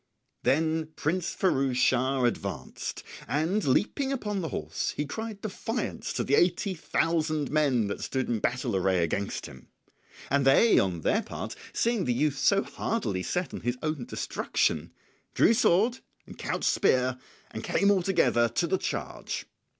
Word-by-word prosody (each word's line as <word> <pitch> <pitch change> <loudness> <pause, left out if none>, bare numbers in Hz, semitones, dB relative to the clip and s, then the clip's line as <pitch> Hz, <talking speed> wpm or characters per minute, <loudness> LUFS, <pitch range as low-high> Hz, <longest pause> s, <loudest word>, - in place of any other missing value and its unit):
Then 160 +2 +1
Prince 170 +3 -1
Firouz 135 -8 +1
Schah 130 +1 +2
advanced, 120 - -4 0.2
and 165 +8 0
leaping 220 - +1
upon 210 -7 -2
the 165 - -2
horse - - -3
he 150 - 0
cried 215 +7 -6
defiance 225 +3 -3
to - - -1
the 140 - -1
eighty 180 +5 +3
thousand 155 -3 0
men 140 -7 +2
that 100 - -4
stood 130 -1 -2
in 115 -2 0
battle 120 -1 -1
array 95 -2 +2
against 100 +5 -2
him. 65 0 -12 0.6
And 140 0 +3
they, 135 +12 +6
on 90 -4 0
their - - +2
part, - - -6 0.2
seeing 230 -5 +1
the 120 - +1
youth 145 +1 +1
so 195 +6 +3
hardily 105 - -2
set 180 - -2
on - - -4
his 120 +1 -1
own 155 -5 -2
destruction, - - -1 0.4
drew - - +5
sword 230 +2 +3 0.3
and - - -11
couched - - -3
spear, 130 - +2 0.3
and - - -6
came 200 +1 +3
all 195 -2 +3
together 140 -10 +3
to 120 +10 0
the 185 +2 0
charge. - - -4
155 Hz, 160 wpm, -28 LUFS, 125-190 Hz, 0.6 s, they